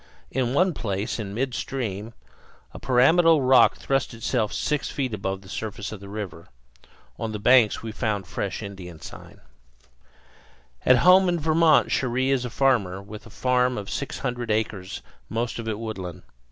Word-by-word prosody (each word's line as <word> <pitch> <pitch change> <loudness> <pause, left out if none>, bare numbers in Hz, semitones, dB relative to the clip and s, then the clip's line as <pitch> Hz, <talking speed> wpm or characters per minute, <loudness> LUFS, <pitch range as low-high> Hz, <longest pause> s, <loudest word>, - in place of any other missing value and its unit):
In 130 0 -1
one 185 +3 +3
place, 105 -1 -3
in 100 -2 -5
midstream, 120 -4 -3 0.6
a - - -8
pyramidal 155 +5 +4
rock 130 0 +5
thrust 135 -2 -1
itself 115 -1 -1
six 150 -2 -1
feet 130 -5 -3
above 95 -1 -3
the - - -14
surface 105 0 -5
of 110 - -7
the 100 0 -11
river. 100 -5 -7 0.7
On 110 -1 -3
the - - -2
banks 115 +1 +4
we 110 - -5
found 105 -3 -2
fresh - - -4
Indian 90 -5 -9
sign. - - -12 1.5
At 130 - +7
home 185 0 +7
in 175 -1 0
Vermont 160 0 +4
Cherrie 130 +1 +1
is 130 -2 +1
a - - -4
farmer, 115 -8 +1
with 105 +3 -11
a - - -12
farm 125 +1 +1
of 100 -2 -6
six 140 - -4
hundred 125 -3 -4
acres, 105 -3 -2 0.3
most 115 +1 -2
of 115 - -6
it 110 -2 -2
woodland. 100 -6 -6
115 Hz, 165 wpm, -25 LUFS, 105-130 Hz, 1.5 s, At